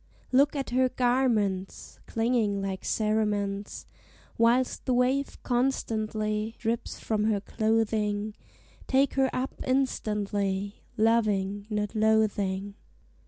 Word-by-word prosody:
Look 280 +3 +4
at 275 -3 -3
her 255 +1 +3
garments 235 -7 0
Clinging 225 -3 +1
like 195 -1 -4
cerements, 210 -2 -1 0.5
Whilst 240 +2 +2
the 255 - +2
wave 260 +3 +1
constantly 220 -4 -1
Drips 230 0 -3
from 215 -1 -1
her 215 -2 +2
clothing; 215 -1 0 0.5
Take 270 +1 +3
her 265 -1 +2
up 260 +1 -2
instantly, 205 -6 -1 0.2
Loving, 205 -3 +1
not 210 -1 -2
loathing! 205 -3 +1
220 Hz, 100 wpm, -28 LUFS, 205-245 Hz, 0.5 s, Look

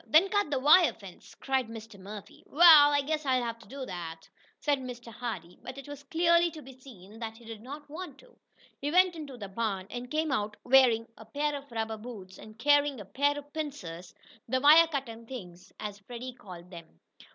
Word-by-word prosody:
"Then 320 - +5
cut 410 -5 +1
the 285 - 0
wire 305 +6 +6
fence!" 195 -4 -14
cried 265 -3 -1
Mr. 225 -2 -10
Murphy. 205 +1 -10
"Wa'al, 305 -2 +8
I - - +2
I - - +2
guess 305 +2 -2
I'll 255 -3 +1
have 230 -1 -4
to," 185 -11 -7 0.4
said 290 -2 +1
Mr. 240 -2 -8
Hardee, 185 -8 -6
but 260 - -8
it 275 - -9
was 290 -1 -8
clearly 340 +3 +3
to 310 -2 -11
be 265 - -12
seen 225 -5 -14
that 225 -1 -6
he 235 - -16
did 225 -2 -9
not 285 +5 -9
want 345 +5 -8
to. - - -20 0.5
He 285 - -1
went 365 +2 +4
into 290 -5 -8
the 205 -4 -7
barn, 195 -2 -2
and 245 0 -6
came 310 +1 -1
out 210 -4 -1
wearing 245 -3 +5
a 220 - -11
pair 290 +6 -1
of 280 -2 -9
rubber 225 -1 -3
boots, 210 -5 -10
and 215 0 -13
carrying 290 +1 +3
a 205 - -8
pair 285 +8 +1
of 290 0 -10
pincers 185 - -6 0.3
the 260 +2 +1
"wire 310 +4 +8
cutting 235 -7 -5
things," 185 -7 -10
as 205 -1 -6
Freddie 245 +4 -8
called 180 -6 -12
them. 170 -2 -12
250 Hz, 205 wpm, -29 LUFS, 215-290 Hz, 0.5 s, Wa'al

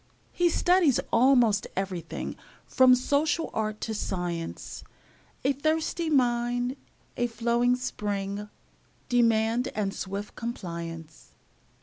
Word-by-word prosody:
He 350 -1 +2
studies 350 -5 +3
almost 235 -4 +4
everything 185 -3 -4 0.3
From 255 -1 +6
social 295 +5 0
art 215 -1 -2
to 225 - -3
science; 175 -5 -4 0.6
A 275 - +3
thirsty 315 +3 -1
mind, 245 -2 +1 0.4
a 240 - +1
flowing 235 +2 +1
spring, 205 -4 -3 0.6
Demand 230 0 +2
and 200 -2 -1
swift 200 +2 -5
compliance. 170 -8 -7
235 Hz, 95 wpm, -27 LUFS, 200-255 Hz, 0.6 s, From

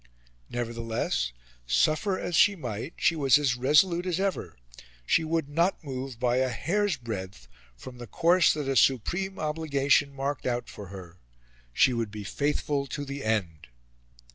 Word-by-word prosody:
Nevertheless, 115 - -2 0.4
suffer 155 - +2
as 175 - -3
she 205 +5 +5
might, 125 - -6
she 165 - +2
was 140 -3 +5
as 140 -4 +1
resolute 170 +8 +3
as 180 0 -1
ever; 190 - -2 0.5
she 165 - +3
would 160 -2 -1
not 170 +6 0
move 130 -3 -6
by 125 0 +1
a 130 0 +2
hair's 185 - 0
breadth 105 -6 -7 0.3
from 125 - -11
the 120 - -8
course 170 - +4
that 150 -3 -3
a 135 - 0
supreme 175 - +1
obligation 145 -2 +1
marked 140 0 -3
out 120 -1 -2
for 105 - -9
her; 90 -2 -11 0.5
she 125 - +4
would 115 -2 -2
be 105 0 -7
faithful 140 +4 -1
to 145 +2 -5
the 140 0 -6
end. 90 -10 -2
135 Hz, 155 wpm, -27 LUFS, 115-160 Hz, 0.5 s, she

